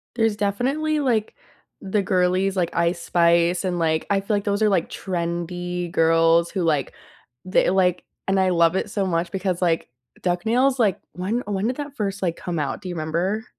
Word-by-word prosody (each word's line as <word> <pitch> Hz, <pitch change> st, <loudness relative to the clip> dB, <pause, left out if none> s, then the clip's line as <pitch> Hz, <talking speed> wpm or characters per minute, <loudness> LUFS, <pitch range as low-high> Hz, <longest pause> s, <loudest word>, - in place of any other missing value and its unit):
There's 225 Hz, -2 st, +2 dB
definitely, 265 Hz, +10 st, 0 dB
like, 235 Hz, -7 st, 0 dB, 0.5 s
the 200 Hz, +2 st, 0 dB
girlies 185 Hz, 0 st, +1 dB
like 175 Hz, -3 st, -1 dB
Ice 170 Hz, 0 st, +1 dB
Spice 170 Hz, +1 st, +2 dB
and, 180 Hz, -2 st, -1 dB
like, 160 Hz, -1 st, +1 dB
I 200 Hz, -1 st, +2 dB
feel 200 Hz, +2 st, -1 dB
like 200 Hz, -, -1 dB
those 205 Hz, 0 st, -1 dB
are, 215 Hz, -, +4 dB
like, 185 Hz, -5 st, +1 dB
trendy 175 Hz, 0 st, -3 dB
girls 165 Hz, +1 st, +3 dB
who, 190 Hz, -3 st, -2 dB
like, 150 Hz, -5 st, 0 dB, 0.5 s
the 185 Hz, -, +2 dB
like 180 Hz, -2 st, +2 dB, 0.2 s
and 195 Hz, 0 st, +2 dB
I 190 Hz, 0 st, +3 dB
love 170 Hz, 0 st, +3 dB
it 200 Hz, -, -2 dB
so 200 Hz, -3 st, -1 dB
much 170 Hz, -1 st, -1 dB
because 185 Hz, -1 st, -2 dB
like 165 Hz, -2 st, 0 dB, 0.3 s
duck 180 Hz, +2 st, -1 dB
nails, 255 Hz, +4 st, +2 dB
like, 210 Hz, -6 st, +2 dB
when 190 Hz, +7 st, -2 dB
when, 200 Hz, -1 st, -1 dB
eh, -, -, +2 dB
did 250 Hz, -, -3 dB
that 290 Hz, -1 st, -6 dB
first, 200 Hz, -4 st, -3 dB
like, 170 Hz, -3 st, 0 dB
come 175 Hz, -3 st, -4 dB
out? 140 Hz, +3 st, -3 dB
Do 185 Hz, -, -7 dB
you 175 Hz, -, -4 dB
remember? 170 Hz, +8 st, -2 dB
185 Hz, 200 wpm, -23 LUFS, 170-205 Hz, 0.5 s, are